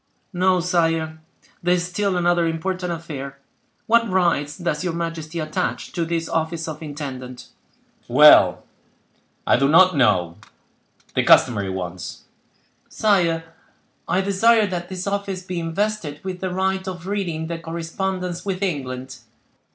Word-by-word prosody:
"No, 185 0 +3
sire; 165 -3 0 0.4
there 180 +1 +3
is 175 0 -1
still 185 +1 -1
another 175 -1 +2
important 180 +2 -2
affair. 140 -5 -6 0.5
What 230 0 +3
rights 170 -6 +1
does 175 -3 -2
your 180 -2 -1
majesty 165 -1 -4
attach 155 -1 -3
to 170 -2 -2
this 165 0 -2
office 165 0 -2
of 155 0 -6
intendant?" 130 -4 -7 0.6
"Well—I - - +3
do 135 +2 +3
not 185 +3 +6
know—the 90 - -2
customary 105 -6 +4
ones." 90 -1 -6 0.7
"Sire, 175 -6 +2 0.6
I 190 - +2
desire 215 +3 +4
that 175 -3 -4
this 185 -1 -5
office 200 -2 -3
be 180 -1 -4
invested 165 -2 -2
with 185 -1 -5
the 185 0 -3
right 190 +1 -1
of 180 -2 -6
reading 185 -5 -2
the 165 0 -4
correspondence 175 +2 -4
with 195 -1 -3
England." 130 -6 -4
170 Hz, 130 wpm, -22 LUFS, 155-185 Hz, 0.7 s, not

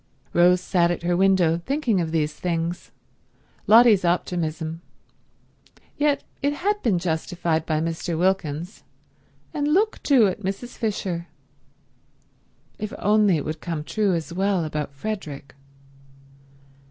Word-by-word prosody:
Rose 180 +1 +5
sat 175 -1 +2
at 175 - -3
her 175 0 +1
window 180 -3 +3
thinking 265 - 0
of 160 -1 -3
these 155 -2 0
things. 170 0 -3 0.8
Lotty's 225 -3 +7
optimism... 165 -2 -1 1.1
yet 290 -1 +1 0.2
it 285 +1 +1
had 410 +7 -1
been 210 -7 +2
justified 165 -1 -1
by 155 -1 +1
Mr. 165 +1 -2
Wilkins; 175 0 -1 0.7
and 290 -1 -1
look, 400 +8 +1
too, 265 -6 +5
at 190 - -1
Mrs. 200 +5 -5
Fisher. 190 -6 -3 1.5
If 210 0 -5
only 210 -4 +3
it 145 - -4
would 155 +1 -5
come 165 -4 -4
true 200 +2 0
as 165 0 -4
well 190 -2 0
about 150 -2 -4
Frederick! 145 -4 -6
180 Hz, 125 wpm, -24 LUFS, 165-210 Hz, 1.5 s, Lotty's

